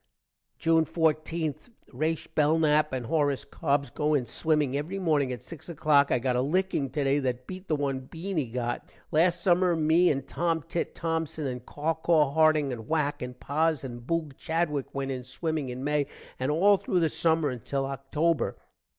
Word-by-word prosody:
June 165 0 +3
14. 160 0 0 0.4
Rashe 155 +5 -1
Belnap 155 0 +3
and 130 -2 -3
Horris 145 +1 +1
Cobbs 140 -1 -1
go 150 0 +1
in 130 -4 +1
swimming 150 +2 0
every 155 +7 -3
morning 150 -8 +1
at 125 - -6
six 165 0 -10
o'clock. 150 -3 +3
i - - +4
got 125 +1 0
a 125 - +2
licking 155 -1 0
today 140 +1 +1
that 125 -2 -2
beat 185 +4 -8
the 155 - +1
one 140 -2 -1
Beany 160 +1 -4
got. 120 0 -3 0.2
last 170 +3 +3
summer 180 0 +3
me 160 +3 +4
and 135 -2 -1
Tomtit 165 0 -2
Tomson 160 -2 -2
and 125 -2 -4
Cawcaw 155 -1 +1
Harding 155 -3 +3
and 110 -2 -8
Whack 150 -2 0
and 125 0 -6
Poz 155 0 0
and 120 -2 -6
Boog 155 +1 -2
Chadwick 160 -4 -1
went 135 0 -2
in 130 -1 -4
swimming 155 +2 -3
in 125 +1 -5
May 150 0 +1 0.3
and 130 +2 -1
all 195 +7 +5
thru 185 - 0
the 165 - +3
summer 160 -1 +1
until 135 +3 -3
October. 140 +3 -1
150 Hz, 170 wpm, -28 LUFS, 135-165 Hz, 0.4 s, all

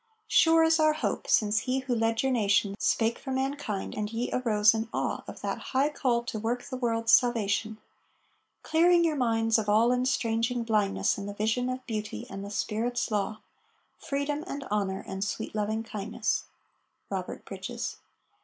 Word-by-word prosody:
Sure 325 0 +5
is 325 0 +4
our 310 0 +4
hope 310 - -2
since 215 0 +3
he 255 +4 -1
who 260 -1 -2
led 225 0 +1
your 265 - +2
nation 205 -4 +2
Spake 225 0 +1
for 270 - -8
mankind, 265 -5 -2
and 210 0 -3
ye 230 +2 -2
arose 215 -4 +4
in 225 0 -3
awe - - -2
Of - - -9
that - - -3 0.2
high 280 +3 +4
call 245 -5 0
to 235 -2 -4
work 235 +3 -2
the 260 - -6
world's 230 -2 0
salvation; 220 -2 +2 0.9
Clearing 345 +2 +4
your 320 -2 +1
minds 225 -3 +2
of 210 -1 -2
all 225 +3 +4
estranging 245 -2 0
blindness 210 -3 +1
In 200 - -5
the 205 - -6
vision 220 +4 0
of 255 0 -4
Beauty 215 -3 -4
and 195 0 -6
the 200 - -6
Spirit's 230 +3 -2
law, 215 +1 -1 0.6
Freedom 285 +2 -2
and 280 -3 -5
Honor 195 -2 -1
and 190 0 -3
sweet 215 +2 -4
Loving 215 +1 -1
kindness. 215 0 -2 0.7
ROBERT - - -4
BRIDGES. - - -5
230 Hz, 170 wpm, -28 LUFS, 215-255 Hz, 0.9 s, Sure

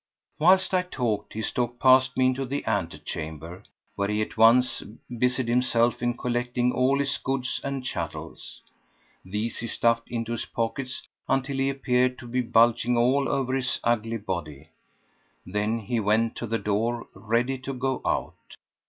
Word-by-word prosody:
Whilst 185 +4 +4
I 185 - +4
talked 125 - -3
he 110 - -4
stalked 120 +1 -2
past 130 0 +5
me 130 - +4
into 130 +1 +1
the 140 +2 -3
ante 95 -8 -1
chamber, 80 +3 -6 0.3
where 100 0 0
he 105 +1 -1
at - - -8
once 115 +3 +5 0.3
busied 125 +1 +1
himself 120 -1 +2
in 120 0 0
collecting 125 0 0
all 130 +2 +2
his 140 0 0
goods 130 -1 -2
and 140 -2 -3
chattels. 85 -9 -6 0.6
These 105 +5 -3
he 115 - -3
stuffed 115 0 +1
into 115 -1 -3
his 120 - -2
pockets 130 +3 -3 0.3
until 135 +1 0
he 135 0 +1
appeared 125 -2 +1
to 120 - -10
be 125 +2 0
bulging 120 0 +3
all 130 +4 +3
over 135 -2 0
his 130 -2 0
ugly 115 -1 0
body; 80 -7 -5 0.8
then 105 +4 -1
he 115 +2 -2
went 110 +2 +1
to 120 - -4
the 115 +1 0
door 115 +3 -1
ready 120 +4 -1
to 130 +1 -5
go 130 0 -2
out. - - -3
120 Hz, 160 wpm, -26 LUFS, 110-130 Hz, 0.8 s, past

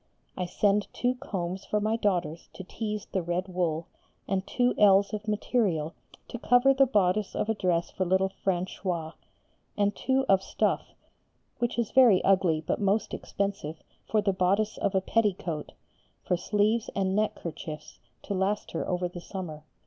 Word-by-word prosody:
I 180 - -2
send 205 +3 +2
two 245 +1 +1
combs 185 -6 -4
for 210 - 0
my 215 +2 +1
daughters 175 -7 -1
to 190 - -8
tease 210 +2 -4
the 190 - -2
red 175 +2 -2
wool, 170 -3 -1 0.4
and 195 0 -1
two 245 0 +2
ells 200 0 +5
of 215 0 -4
material 200 -7 0 0.4
to 240 - -6
cover 245 +3 +5
the 270 0 +4
bodice 205 -3 +1
of 215 - -1
a - - +3
dress 180 -5 0
for 190 - -1
little 190 +1 +2
Françoise, 175 -3 -2 0.6
and 205 0 +1
two 265 +1 +1
of 195 -1 +4
stuff, - - -1 0.6
which 240 0 -1
is 235 -3 -1
very 245 -8 +6
ugly 185 -5 +3
but - - -1
most 200 +2 +1
expensive, 195 -6 -3 0.3
for 215 -1 +2
the 200 -2 +2
bodice 195 +4 +1
of 195 - 0
a 190 - +3
petticoat, 185 -7 -1 0.5
for 180 - +1
sleeves 210 +5 +1
and 190 -1 0
neck 215 +1 +1
kerchiefs, 160 -2 -8 0.2
to 200 - -3
last 195 +2 -1
her - - -3
over 180 -1 0
the 175 0 -9
summer. 160 -5 -7
195 Hz, 165 wpm, -28 LUFS, 180-215 Hz, 0.6 s, very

